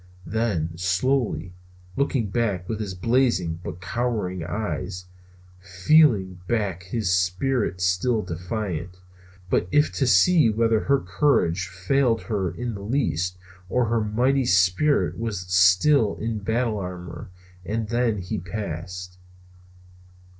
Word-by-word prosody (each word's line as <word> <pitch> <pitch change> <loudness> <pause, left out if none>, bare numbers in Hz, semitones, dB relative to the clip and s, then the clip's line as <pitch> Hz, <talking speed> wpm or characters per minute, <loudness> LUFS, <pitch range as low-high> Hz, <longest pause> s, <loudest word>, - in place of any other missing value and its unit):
Then 100 -8 -1
slowly, 90 - 0 0.4
looking 130 -7 0
back 100 -6 -1
with 110 +1 -3
his 100 -3 -4
blazing 95 -6 +1
but 85 - -6
cowering 100 -4 -2
eyes, 90 0 -4 0.5
feeling 95 - +3
back 105 -7 -1
with 95 - -17
his 105 -6 0
spirit 90 +2 0
still 90 +6 +1
defiant, 90 0 -4
if 90 - -24 0.5
but 90 - +1
to 145 -2 +2
see 160 0 +5
whether 115 0 +2
her 140 +4 +2
courage 90 - +1
failed 115 +6 +1
her 100 -6 -1
in 115 +7 -5
the 100 - -7
least 95 - -1 0.3
or 125 +2 +2
her 115 -1 +1
mighty 125 +5 +1
spirit 95 +12 +2
was 110 -5 -3
still 95 +8 +4
in 110 -1 -3
battle 110 +1 -1
armor; 90 -2 -7 0.3
and 110 +3 -3
then 120 -2 +1
he 95 +3 -4
passed. 90 -1 -6
100 Hz, 125 wpm, -24 LUFS, 90-120 Hz, 0.5 s, see